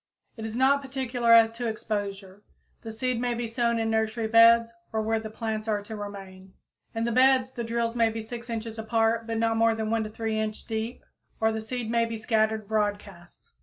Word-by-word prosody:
It 225 -1 -5
is 225 +1 -5
not 275 +2 +4
particular 260 -3 -1
as 225 -1 +7
to 235 +1 -4
exposure. 205 -3 -4 0.4
The 225 - -7
seed 240 +2 -2
may 245 -1 0
be 240 0 -3
sown 235 0 0
in 225 0 0
nursery 220 +1 0
beds 230 +1 +6 0.2
or 220 -1 -1
where 225 +1 0
the 220 0 -7
plants 220 0 -4
are 210 -2 0
to 220 +2 -7
remain. 195 -2 -9 0.4
In 225 - -1
the 235 - 0
beds, 260 +1 +4
the 240 -2 -5
drills 230 0 -1
may 230 -1 +3
be 225 0 -5
6 235 +2 -8
inches 225 -1 -5
apart, 225 0 0
and 225 0 -1
not 225 0 +1
more 225 0 +3
than 220 0 -3
1 220 -1 -1
3 220 0 -2
inch 215 0 -4
deep, 225 +1 -4 0.3
or 220 0 +2
the 220 0 -3
seed 230 0 -4
may 235 0 +2
be 230 0 -5
scattered 220 -1 0
broadcast. 205 -4 -4
225 Hz, 205 wpm, -27 LUFS, 220-235 Hz, 0.4 s, as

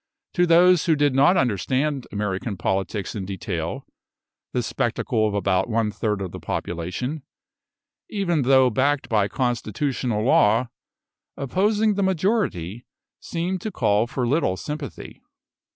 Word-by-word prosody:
To 175 0 +3
those 175 +1 +5
who 160 - +4
did 145 -2 +2
not 140 +8 +5
understand 130 - 0
American 100 0 -3
politics 95 +2 -2
in 105 - -4
detail, 90 -3 -4 0.7
the - - -1
spectacle 110 -1 0
of 105 - -3
about 95 0 +1
one 110 -1 +1
third 105 -2 -2
of 90 - -5
the - - -7
population, 90 - -4 0.9
even 185 -7 0
though 130 -1 +4
backed 140 +4 +1
by 105 -3 +2
constitutional 120 -1 -1
law, 115 0 +3 0.7
opposing 205 - +1
the 200 - -1
majority, 185 - 0 0.4
seemed 175 +2 -3
to 215 - -3
call 105 - +2
for 125 +1 -2
little 120 - +1
sympathy. 150 +2 -7
125 Hz, 130 wpm, -23 LUFS, 105-160 Hz, 0.9 s, those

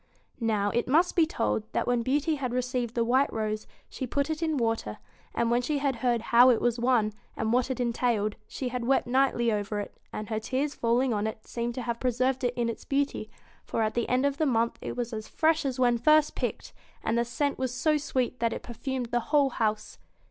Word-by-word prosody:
Now, 210 -3 +1
it 240 - 0
must 325 +7 +3
be 330 -3 +4
told, 105 - -1
that - - 0
when 245 -1 +1
Beauty 290 +6 +1
had 260 -5 -3
received 250 -2 -2
the 235 - +2
white 260 +4 +2
rose 215 -1 -3 0.2
she 260 - -5
put 280 +5 0
it 315 +1 -3
in 315 -2 0
water, 225 - -1 0.4
and 235 0 +1
when 240 +1 +3
she 295 +4 -1
had 275 -3 0
heard 240 -1 +1
how 245 +2 +8
it 240 - +4
was 240 0 0
won, 235 -4 +2 0.2
and 220 +1 0
what 250 +1 +2
it 260 - -3
entailed, 235 -3 0
she 255 - -4
had 245 -1 -3
wept 270 - +3
nightly 245 -2 +2
over 205 0 -2
it, 205 - -6 0.2
and 215 +1 -6
her 220 -1 -1
tears 265 +6 -1
falling 240 +1 +1
on 210 0 0
it 220 0 -7
seemed 235 0 -3
to 255 - -4
have 235 0 -3
preserved 255 +1 0
it 245 0 0
in 240 -1 0
its 230 - -4
beauty, 275 -6 -1 0.3
for 225 - -1
at 215 - 0
the 235 - -1
end 255 +2 +2
of 280 -1 0
the 310 - +2
month 235 -2 +1
it - - -5
was 240 -1 -3
as 215 -1 -5
fresh 320 -1 +1
as 260 -2 -2
when 240 -2 +3
first 305 +4 +4
picked; - - -4 0.3
and 225 - 0
the 235 - +3
scent 275 +4 -1
was 260 -2 -1
so 305 +5 +1
sweet 255 -4 -1
that 230 -1 +1
it - - -6
perfumed 245 +2 -4
the 240 - +2
whole 285 -3 +4
house. 215 -2 -2
245 Hz, 230 wpm, -28 LUFS, 230-265 Hz, 0.4 s, how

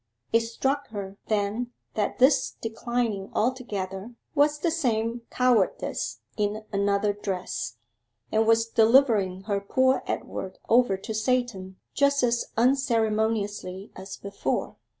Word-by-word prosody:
It 230 - +7
struck 265 +5 -1
her 200 -2 -7
then 215 +3 -1 0.2
that 210 -2 -1
this 265 +1 +4
declining 225 -3 -2
altogether 215 -3 -2 0.2
was 295 0 +3
the 325 +3 0
same 235 -7 0
cowardice 245 -6 +1
in 210 +1 -1
another 200 +1 +2
dress, 190 - -4 0.5
and 220 0 +2
was 225 0 +4
delivering 220 -5 +4
her 200 -1 -1
poor 260 +6 +2
Edward 190 - -4
over 235 -4 +4
to 220 +3 -6
Satan 215 -5 -1 0.2
just 280 -1 +3
as 235 -1 +1
unceremoniously 220 -6 +1
as 190 +1 -8
before. 200 0 -3
220 Hz, 115 wpm, -26 LUFS, 200-245 Hz, 0.5 s, It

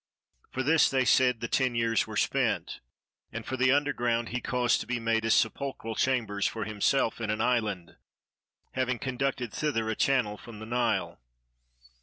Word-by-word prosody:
For 130 - -3
this 160 +3 +4
they 130 -1 +1
said, 125 -2 +3
the 115 - -2
ten 130 -1 +1
years 115 -1 +1
were - - -5
spent, - - 0 0.5
and 115 0 -6
for 130 - -3
the 130 0 +3
underground 120 -5 +1
he 125 +1 -3
caused 125 -1 +1
to - - -8
be 125 -1 -1
made 115 -1 0
as 115 - +4
sepulchral 115 0 -1
chambers 110 -5 0
for 110 - -4
himself 110 +3 0
in 110 - -2
an 105 - -1
island, 110 -8 -1 0.7
having 130 -1 -1
conducted 130 -2 -2
thither 115 -8 -1
a - - -2
channel 120 -7 +1
from 115 -1 -11
the 110 - -8
Nile. 120 +1 -1
120 Hz, 170 wpm, -28 LUFS, 110-130 Hz, 0.7 s, this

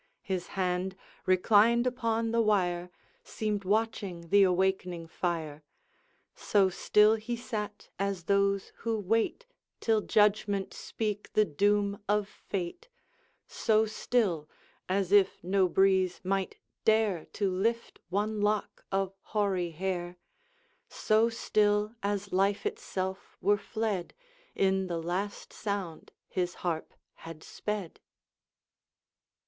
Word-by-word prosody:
His 185 -2 -3
hand, 185 0 0 0.3
reclined 215 +6 +5
upon 230 -2 0
the 230 0 +3
wire, 180 -5 +1 0.3
Seemed 210 -2 -2
watching 200 -4 -1
the 200 +2 +6
awakening 185 -2 +1
fire; 160 -3 -3 0.7
So 195 -2 +2
still 210 +4 +4
he 230 +2 -4
sat 215 -4 -5
as 195 -3 -1
those 200 +1 +1
who 230 -1 -1
wait 225 - 0 0.3
Till 220 -2 +2
judgment 205 -2 +2
speak 210 -2 -4
the 215 - +4
doom 200 +5 +1
of 210 -1 +2
fate; 195 - -6 0.6
So 220 -1 +2
still, 210 -8 0 0.4
as 190 -1 0
if 200 -4 +4
no 190 +1 +3
breeze 190 0 +3
might 195 0 -1 0.3
dare 215 -6 +2
To 200 -2 0
lift 230 +6 -1
one 210 +3 -1
lock 210 0 0
of 195 0 0
hoary 195 -5 0
hair; 175 +1 -3 0.7
So 220 +2 +2
still, 210 -1 +1
as 200 -1 -2
life 195 - +2
itself 190 - -4
were 205 - +3
fled 215 -6 -3 0.4
In 190 -1 +2
the 170 -2 -2
last 180 +5 -4
sound 200 -6 -4 0.2
his 180 -1 -2
harp 165 -2 -2 0.2
had 165 -1 -10
sped. 210 -5 -5
200 Hz, 115 wpm, -30 LUFS, 185-215 Hz, 0.7 s, the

